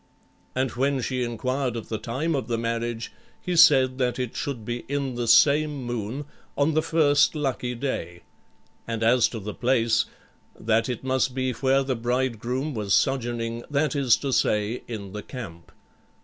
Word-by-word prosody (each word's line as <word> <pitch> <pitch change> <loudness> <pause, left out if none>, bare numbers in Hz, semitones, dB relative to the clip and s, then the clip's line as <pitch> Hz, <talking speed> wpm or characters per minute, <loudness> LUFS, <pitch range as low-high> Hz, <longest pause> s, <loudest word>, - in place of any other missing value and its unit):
And 130 -1 0
when 135 +3 0
she 130 +1 -2
inquired 125 +2 -2
of 115 - -6
the 110 - -3
time 140 +8 -2
of 135 -3 -2
the 115 -1 -1
marriage, 115 0 -3 0.3
he 180 - -3
said 135 -6 +6
that 125 -2 0
it 125 -2 -3
should 125 -6 -4
be 120 +1 -3
in 140 -2 -2
the 120 -1 -3
same 145 +4 +4
moon, 120 +3 -4 0.3
on 145 +2 +2
the 155 - +3
first 155 -2 +3
lucky 130 -4 -2
day; 85 -10 -4 0.6
and 115 -1 -2
as 120 +1 +5
to 115 - -7
the 105 +1 -6
place, 115 -3 +2 0.5
that 115 +3 +1
it 125 -1 -4
must 130 -1 0
be 130 -1 0
where 135 +2 +2
the 130 -1 -1
bridegroom 125 +3 -1
was 105 -4 +1
sojourning, 120 -3 -1
that 145 0 0
is 135 -5 +4
to 135 -2 -3
say, 105 +2 +1
in 100 -5 -6
the 105 +1 -6
camp. 95 -12 -9
125 Hz, 170 wpm, -25 LUFS, 115-135 Hz, 0.6 s, said